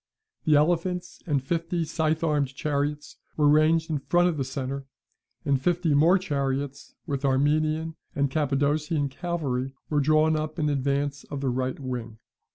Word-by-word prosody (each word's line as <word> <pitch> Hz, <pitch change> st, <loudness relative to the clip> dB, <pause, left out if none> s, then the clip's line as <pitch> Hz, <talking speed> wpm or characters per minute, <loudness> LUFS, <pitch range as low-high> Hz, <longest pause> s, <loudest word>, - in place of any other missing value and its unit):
The 155 Hz, -2 st, +5 dB
elephants 175 Hz, +4 st, 0 dB
and 140 Hz, -4 st, +1 dB
fifty 165 Hz, +2 st, -1 dB
scythe 160 Hz, 0 st, 0 dB
armed 145 Hz, -4 st, 0 dB
chariots 145 Hz, +1 st, -2 dB, 0.2 s
were 150 Hz, -1 st, +4 dB
ranged 160 Hz, +2 st, +4 dB
in 150 Hz, -, 0 dB
front 175 Hz, +5 st, +3 dB
of 165 Hz, -, -2 dB
the 135 Hz, -, 0 dB
centre; 135 Hz, +1 st, -4 dB, 0.6 s
and 140 Hz, -2 st, +2 dB
fifty 175 Hz, 0 st, +1 dB
more 165 Hz, +6 st, +5 dB
chariots, 140 Hz, -4 st, -3 dB
with 140 Hz, -2 st, -2 dB
the 140 Hz, -, +1 dB
Armenian 155 Hz, +4 st, +1 dB, 0.2 s
and 140 Hz, -1 st, +1 dB
Cappadocian 145 Hz, +1 st, +1 dB
cavalry, 135 Hz, -5 st, -3 dB, 0.2 s
were 150 Hz, -, +3 dB
drawn 155 Hz, +2 st, +3 dB
up 155 Hz, 0 st, -3 dB
in 150 Hz, -1 st, +1 dB
advance 140 Hz, 0 st, -1 dB
of 145 Hz, -2 st, -6 dB
the 135 Hz, -, 0 dB
right 130 Hz, +2 st, -2 dB
wing. 125 Hz, -4 st, -5 dB
145 Hz, 160 wpm, -26 LUFS, 140-160 Hz, 0.6 s, The